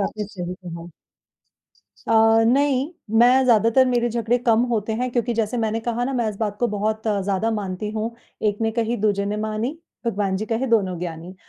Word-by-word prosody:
आपने 210 +1 -2
सही 180 -3 -6
कहा। 170 -2 -9 1.2
अ, - - +2 0.3
नहीं, 275 +3 +2 0.3
मैं 255 +2 +6
ज़्यादातर 230 +2 +4
मेरे 240 -1 +1
झगड़े 235 +1 0
कम 230 +1 +4
होते 220 -1 -1
हैं 250 +2 -2
क्योंकि 240 -1 -1
जैसे 225 +1 -1
मैंने 225 0 -1
कहा 240 +1 -2
ना, 270 - -2
मैं 240 -4 0
इस 205 - -5
बात 210 -2 -2
को 240 - +3
बहुत 215 +1 -2
ज़्यादा 200 +1 0
मानती 205 -2 -3
हूँ, 220 +1 -2 0.3
एक 210 -1 +1
ने 225 - +2
कही, 230 +1 -1
दूजे 200 -1 +1
ने 210 +1 -2
मानी, 220 +8 -3 0.3
भगवान 200 -3 0
जी 215 +2 -4
कहें, 235 +3 -1
दोनों 190 -6 +2
ज्ञानी। 170 +1 -6
220 Hz, 190 wpm, -22 LUFS, 205-240 Hz, 1.2 s, मैं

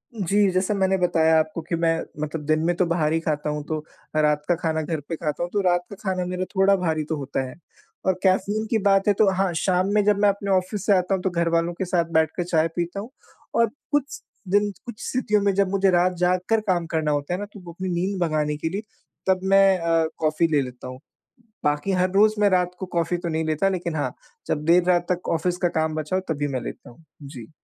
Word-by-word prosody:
जी, 200 0 +2
जैसा 185 +3 0
मैंने 190 -1 +2
बताया 160 -3 +3
आपको 155 +1 -2
कि 170 +2 -3
मैं 165 0 +1 0.2
मतलब 150 0 -4
दिन 155 +1 +2
में 175 +1 +1
तो 180 - +2
बाहर 165 -2 +1
ही 165 - +2
खाता 150 -2 -2
हूँ, 150 0 -3
तो 155 +1 -3 0.4
मैं 155 - +3
रात 150 -1 +2
का 175 - +3
खाना 160 -1 -1
घर 155 0 -3
पे 165 - -1
खाता 155 0 -3
हूँ, 175 - -3
तो 205 - +2
रात 175 -2 +2
का 200 - -8
खाना 185 -2 -1
मेरा 180 +1 -3
थोड़ा 195 +1 +5
भारी 160 -4 -1
तो 160 - 0
होता 140 -1 -3
है। - - -11 0.5
और 190 - +3
कैफ़ीन 205 +3 +1
की 225 - +2
बात 195 0 +3
है 205 - +5
तो 205 0 +3
हाँ, 190 -1 0
शाम 180 +2 +1
में 210 -1 +3
जब 210 -1 +3
मैं 205 - +5
अपने 200 0 -2
ऑफिस 190 +1 0
से 205 - +4
आता 180 +1 0
हूँ 190 - -4
तो 190 - +1
घर 170 -1 0
वालों 170 +1 +1
के 190 +2 -3
साथ 175 -1 +1
बैठ 160 -1 +4
के 175 - -1
चाय 165 -2 +2
पीता 175 +3 -2
हूँ, 215 +4 -7 0.5
और 230 0 +4 0.2
कुछ 290 -2 -1 0.3
दिन 205 +2 +2
कुछ 235 -2 -8
स्थितियों 215 -5 +1
में 200 0 +2
जब 195 -1 +2
मुझे 195 0 +2
रात 180 +1 +3
जाग 180 +1 +2
कर 225 0 +4
काम 175 -3 +1
करना 155 -1 +1
होता 145 +3 -1
है 180 - -2
ना, 205 - -4
तो 205 0 -14
वो 175 -2 -10
अपनी 185 +2 -5
नींद 185 +3 -1
भगाने 155 -3 0
के 160 +2 -2
लिए 195 +5 -3 0.5
तब 190 -1 +3
मैं 195 0 +5
अ, 165 -1 +2
कॉफी 155 +2 +1
ले 145 -2 +3
लेता 125 -1 -7
हूँ। 130 0 -8 0.7
बाकी 150 +6 +1
हर 185 0 +2
रोज़ 210 +3 +4
मैं 205 - +5
रात 180 -2 +2
को 190 - -3
कॉफ़ी 170 +1 +1
तो 175 0 -4
नहीं 160 0 -1
लेता 155 +5 +1
लेकिन 175 -3 -3
हाँ, 145 - -2 0.3
जब 150 - -1
देर 170 +2 +5
रात 175 -1 +2
तक 180 0 -2
ऑफिस 175 +2 0
का - - +6
काम 160 0 0
बचा 155 +3 -2
हो - - -1
तभी 145 -1 -2
मैं 130 -2 -2
लेता - - -8
हूँ। 140 +8 -20 0.2
जी। 125 -5 -10
175 Hz, 250 wpm, -24 LUFS, 160-195 Hz, 0.7 s, का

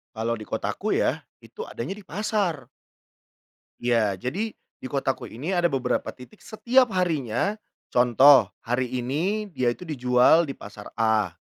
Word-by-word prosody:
Kalau 115 +1 -2
di 105 - -9
kotaku - - -2
ya - - +1 0.2
itu - - -9
adanya 120 +8 -5
di 200 -1 -9
pasar. 200 - -2 1.2
Iya, 115 -5 +2
jadi 175 - -4 0.2
di - - -6
kotaku 135 -1 -2
ini 140 +11 -5
ada 175 -2 +3
beberapa 130 -5 -1
titik 130 +12 -15
setiap 245 +4 +2
harinya. 170 - 0 0.3
Contoh 125 0 +6 0.2
hari 125 +2 -1
ini 165 - -2
dia 130 -7 -1
itu 120 - -8
dijual 135 +1 +3
di 135 - -5
pasar 105 0 -11
A, 110 -5 +1
135 Hz, 140 wpm, -25 LUFS, 120-180 Hz, 1.2 s, Contoh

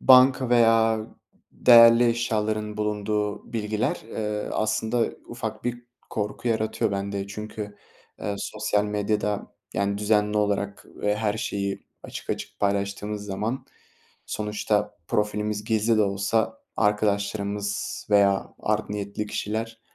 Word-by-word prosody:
banka 130 -1 +6
veya 115 -2 +4 0.5
değerli 115 0 +8
eşyaların 110 -2 -1
bulunduğu 105 +1 -2
bilgiler, 110 0 -1
eee, 105 -2 -3
aslında 110 +2 +1 0.2
ufak 110 -2 -5
bir 120 0 -2 0.3
korku 105 +3 -2
yaratıyor 110 0 0
bende. 100 0 -2
Çünkü, 105 0 -6 0.4
eee, 100 - -2
sosyal 105 0 0
medyada, 105 0 -1 0.2
yani, 100 0 0
düzenli 105 0 +2
olarak 100 -1 -1
ve 105 0 0
her 105 -1 0
şeyi 100 -4 -3 0.2
açık - - -7
açık - - -5
paylaştığınız 100 +1 -1
zaman, 105 +6 -3 0.6
sonuçta 105 0 -1
profilimiz 105 0 0
gizli 110 +1 +2
de 110 - +5
olsa 105 +3 0 0.2
arkadaşlarımız 105 0 0
veya 100 -1 +3
art 105 -1 -1
niyetli 105 +1 -3
kişiler, 115 +2 -3
105 Hz, 110 wpm, -25 LUFS, 105-110 Hz, 0.6 s, değerli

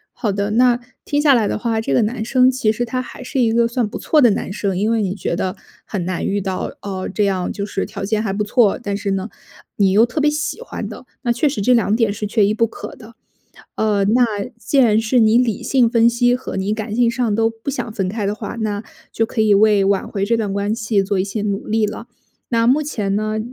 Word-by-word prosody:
好 230 -4 -1
的， 200 +1 -1
那 245 +1 +4 0.3
听 290 0 0
下 290 -3 +5
来 220 -4 +2
的 - - -2
话， 225 -1 -1
这 225 - -3
个 245 - +4
男 220 +1 -2
生 255 +1 +4
其 255 -4 0
实 240 +3 -1
他 255 +2 -3
还 255 - -10
是 265 - -2
一 230 -2 +3
个 235 0 +3
算 235 -1 -1
不 - - -6
错 305 - +2
的 245 - +6
男 200 - -2
生， 195 -2 -2
因 210 +3 +1
为 230 -1 +1
你 190 -2 -1
觉 200 - -3
得 185 +1 -2 0.3
很 190 -5 -4
难 180 0 -3
遇 200 +1 0
到， 190 -1 -4
哦， 190 -2 -4
这 210 - +1
样 190 -2 -1
就 200 - -4
是 195 - -2
条 - - -6
件 215 +2 0
还 200 - -2
不 210 +2 -1
错， 210 0 +3
但 200 -4 -3
是 200 -1 -2
呢， 195 +2 -2 0.5
你 195 -2 +3
又 215 +4 +6
特 250 +5 -3
别 295 - +3
喜 305 +9 -3
欢 - - -6
的， - - -10 0.2
那 240 - +1
确 250 +5 +1
实 270 - -3
这 250 +5 +3
两 220 -2 +2
点 225 -4 +1
是 210 +1 -4
缺 210 -1 +2
一 210 - +1
不 230 +1 +2
可 225 - -9
的。 230 0 -14 0.6
呃， 210 -2 +1
那 240 +5 +4 0.3
既 275 - -1
然 220 -4 +5
是 225 +3 +1
你 220 +1 +5
理 240 -4 0
性 255 -4 +3
分 230 -1 +4
析 245 +1 +2
和 255 - -7
你 195 +2 -1
感 215 -1 -5
性 235 0 +3
上 235 -4 -1
都 225 +1 +2
不 225 +5 -6
想 250 -5 -4
分 195 -3 -2
开 210 +1 -3
的 205 - -1
话， 220 - -6
那 210 -1 -2 0.3
就 225 - 0
可 220 - -3
以 215 -2 +4
为 205 -1 +4
挽 195 0 +1
回 200 -1 -2
这 230 +3 +1
段 210 -3 -2
关 200 +2 -1
系 215 -3 0
做 195 0 -1
一 - - 0
些 205 +1 -4
努 200 -1 -2
力 220 0 +1
了。 220 +2 -7 0.4
那 230 -1 +2
目 270 +5 +4
前 210 -10 -2
呢， 215 +1 -1
220 Hz, 280 characters per minute, -19 LUFS, 200-240 Hz, 0.6 s, 的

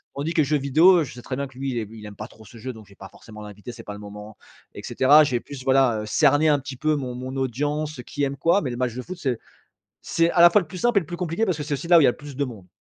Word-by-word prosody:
Tandis 145 +4 -3
que 165 - 0
les - - +2
jeux 150 +2 +1
vidéo, 160 +6 +5
je 130 - -8
sais 125 - -10
très 130 - -5
bien 140 +1 -3
que 130 -1 -19
lui, 135 0 -3
il 120 - -3
ai 110 - -5
il 110 -2 -11
aime 105 - -10
pas 105 - -7
trop 110 - -17
ce 115 +3 -14
jeu 130 +3 -6
donc 110 -3 -13
je 100 - -22
vais - - -17
pas 95 -1 -11
forcément 105 0 -13
l'inviter, 105 +3 -10
c'est 115 - -11
pas 105 - -7
le 105 - -10
moment, 105 +1 -10 0.4
et - - -9
cetera. 145 +4 +5
J'ai 125 -4 -1
plus 135 -3 -10
voilà, 130 -4 +3
heu, - - -6
cerné 145 +6 +3
un 145 -2 +3
petit 135 -1 -8
peu 155 +3 +1
mon 130 -4 -4
mon 130 +2 -6
audience, 145 +3 -2
qui 145 - -4
aime 140 0 -2
quoi, 170 +8 +2
mais 140 - -3
le 120 - -5
match 125 -2 -2
de 125 - -4
foot, 180 +7 -8
c'est 130 -6 -1 0.7
c'est 165 0 +1
à 170 - +1
la 175 0 +9
fois 210 - +4
le - - -11
plus 185 - -8
simple 240 0 +3
et - - +1
le 165 - -9
plus 175 - -6
compliqué 180 +4 -1
parce 185 -6 -1
que - - -3
c'est 145 0 -2
aussi 140 +4 -5
là 175 -1 +7
où - - +6
il - - +4
y - - +7
a - - +5
le - - -16
plus 145 -1 -10
de 140 - 0
monde. 110 -7 -11
135 Hz, 350 wpm, -23 LUFS, 120-155 Hz, 0.7 s, la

